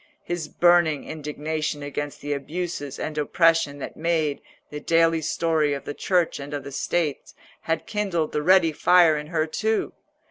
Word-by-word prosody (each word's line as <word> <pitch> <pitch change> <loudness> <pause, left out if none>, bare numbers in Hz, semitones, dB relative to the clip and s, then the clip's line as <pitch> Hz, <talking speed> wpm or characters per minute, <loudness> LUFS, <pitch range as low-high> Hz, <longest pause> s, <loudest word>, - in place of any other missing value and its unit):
His 175 -3 -4
burning 175 -4 +3
indignation 150 0 -4
against 145 0 -5
the 145 +1 -2
abuses 145 -1 -4
and 155 -1 -4
oppression 165 -1 +2
that 145 - -7
made 160 -3 0 0.3
the 150 - -5
daily 165 +1 +2
story 155 -2 +1
of 140 - -8
the 145 - -4
Church 175 0 0
and 145 +1 -6
of 140 -1 -7
States 150 -1 -2 0.3
had 160 -1 -2
kindled 190 -7 -1
the 150 - -1
ready 180 0 +5
fire 170 +1 +5
in 150 0 -5
her 155 -1 0
too. 220 +7 -1
155 Hz, 155 wpm, -24 LUFS, 145-170 Hz, 0.3 s, ready